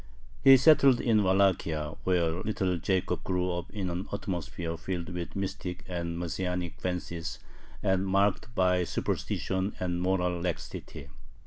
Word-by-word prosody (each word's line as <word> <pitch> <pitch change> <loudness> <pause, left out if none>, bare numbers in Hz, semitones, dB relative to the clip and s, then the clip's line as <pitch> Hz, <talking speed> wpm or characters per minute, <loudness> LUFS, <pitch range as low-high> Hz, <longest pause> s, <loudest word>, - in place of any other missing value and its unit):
He 135 -1 +10
settled 135 -2 +6
in 110 -3 +3
Wallachia, 95 -6 +2
where 85 -3 +2
little 95 -4 -1
Jacob 95 +2 0
grew 90 -1 0
up 85 0 -4
in 95 -4 -3
an 90 +3 -4
atmosphere 90 -4 -3
filled 85 +2 -4
with 90 -1 -5
mystic 95 -2 -4
and 85 -2 -3
Messianic 90 0 -3
fancies 85 -2 -3 0.5
and 95 -1 +2
marked 100 +4 +1
by 90 -1 +3
superstition 95 +2 -2
and 90 -1 -1
moral 90 -1 0
laxity. 85 -5 -5
90 Hz, 130 wpm, -29 LUFS, 85-95 Hz, 0.5 s, He